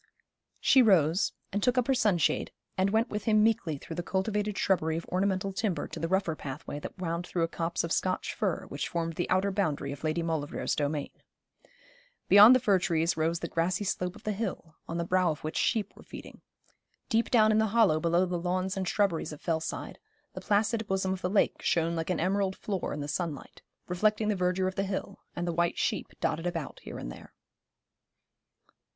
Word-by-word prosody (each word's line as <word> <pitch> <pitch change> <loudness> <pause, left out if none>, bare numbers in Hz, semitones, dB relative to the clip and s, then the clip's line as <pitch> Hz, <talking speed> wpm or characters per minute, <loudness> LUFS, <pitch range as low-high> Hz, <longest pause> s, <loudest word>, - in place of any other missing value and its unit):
She 265 - +5
rose, 180 -5 +4 0.2
and 205 - 0
took 250 +4 +2
up 250 - +3
her 270 - +2
sunshade, 205 - +1 0.2
and 190 +1 +2
went 225 +4 +1
with 210 -1 -3
him 215 -1 +4
meekly 215 -9 +1
through 165 +3 -8
the - - 0
cultivated 205 +3 -1
shrubbery 160 -4 +1
of 165 - -5
ornamental 190 +1 -1
timber 200 -3 -1
to - - -7
the 165 - -1
rougher 185 -2 0
pathway 145 +1 -6
that - - -8
wound 175 -1 -3
through 170 - -1
a - - +2
copse 165 +1 -2
of 170 - -4
Scotch 185 +1 0
fir, 200 -7 -1
which 140 0 -3
formed 165 -1 -2
the 175 - -3
outer 190 +2 +2
boundary 155 -8 -1
of 140 +1 -8
Lady 160 +2 0
Maulevrier's 160 -3 -2
domain. 145 -1 -2 1.2
Beyond 210 +5 +9
the - - +4
fir 205 -6 +3
trees 165 -1 +1
rose 165 +2 0
the 170 - -2
grassy 175 +4 0
slope 180 -1 -2
of - - -14
the 215 - -1
hill, 190 -6 -4
on 165 - -4
the 170 - -1
brow 185 0 +2
of 155 -1 -4
which 155 +1 -4
sheep 215 -4 0
were - - -14
feeding. - - -11 0.7
Deep 230 -1 +1
down 220 -3 +5
in 215 - +3
the 220 - +3
hollow 205 -7 +4
below 170 +3 +2
the 180 -1 -2
lawns 185 +1 -1
and 190 -1 -2
shrubberries 195 -7 0
of 150 - -9
Fellside 160 -2 -3 0.3
the - - -7
placid 215 +1 +1
bosom 190 0 0
of 190 - -6
the 180 - -1
lake 200 +1 +1
shone 165 0 +1
like 165 +1 -3
an 180 - 0
emerald 190 +2 0
floor 195 -4 -3
in 150 - -4
the 145 - -4
sunlight, 155 -2 -4 0.3
reflecting 215 +4 +1
the 210 - +2
verdure 185 0 +1
of 190 - -2
the 195 - -1
hill, 195 0 -4 0.2
and 175 0 -3
the 170 - -1
white 170 0 0
sheep - - -1
dotted 165 +3 -1
about 165 -5 -4
here - - -8
and - - -6
there. - - -13
185 Hz, 205 wpm, -29 LUFS, 165-205 Hz, 1.2 s, Beyond